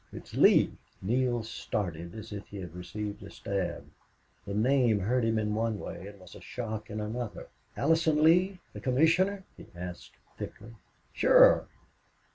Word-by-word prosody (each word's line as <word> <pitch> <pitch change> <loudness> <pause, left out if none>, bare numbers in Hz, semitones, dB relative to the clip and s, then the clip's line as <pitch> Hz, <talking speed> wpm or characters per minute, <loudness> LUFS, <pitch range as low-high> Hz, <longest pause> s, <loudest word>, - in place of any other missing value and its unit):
It's - - -10
Lee." - - +5 0.3
Neale 120 +2 +1
started 85 -6 -4
as 110 -1 -8
if 100 -1 -7
he 100 - -9
had 90 -4 -7
received 100 +4 -6
a - - -9
stab; 95 -4 -3 0.6
the 100 - -3
name 120 -1 +3
hurt 120 +5 +1
him 115 0 +1
in 105 -1 0
one 110 0 0
way 95 - -7
and 100 -1 -12
was 90 -1 -14
a - - -12
shock 110 -3 -5
in 105 0 -4
another. 110 +1 -5 0.3
"Allison 160 0 +3
Lee 180 +4 +4 0.2
the - - -8
commissioner?" 170 +9 +2
he - - -13
asked, 90 0 -8 0.3
thickly. 115 +3 -8 0.4
"Sure. - - +6
110 Hz, 155 wpm, -29 LUFS, 100-130 Hz, 0.6 s, Sure